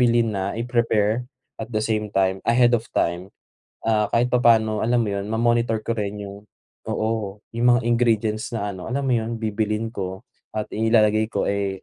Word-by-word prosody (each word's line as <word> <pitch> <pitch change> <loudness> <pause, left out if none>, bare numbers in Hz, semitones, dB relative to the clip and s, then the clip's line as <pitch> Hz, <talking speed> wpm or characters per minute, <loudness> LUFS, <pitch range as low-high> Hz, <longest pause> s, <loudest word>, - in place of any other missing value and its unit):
bilhin 120 -2 +3
na 100 -1 -2
i-prepare 115 -1 +1 0.4
at 110 - -5
the 110 - 0
same 105 -2 -1
time, 95 0 +2
ahead 120 +1 +4
of 115 - -6
time. 85 +3 0 0.6
Ah, 110 -2 +3
kahit 120 +1 +2
papaano, 115 -3 +3
alam 120 +1 +2
mo 110 - -2
'yon 100 0 -3
ma-monitor 115 0 +1
ko 115 - 0
rin 105 0 -3
'yong 100 +1 -10 0.5
oo, 110 -2 -2 0.2
'yong 120 +1 +1
mga - - -2
ingredients 115 -2 +1
na, 105 -3 -2
ano, 90 -1 -8
alam 140 +3 -1
mo 130 - +2
'yon 115 +1 -3
bibilhin 110 0 -1
ko 95 -2 -5 0.3
at 110 -1 -3
inilalagay 110 -1 +3
ko, - - 0
eh, 100 -1 -2
110 Hz, 180 wpm, -23 LUFS, 105-115 Hz, 0.6 s, ahead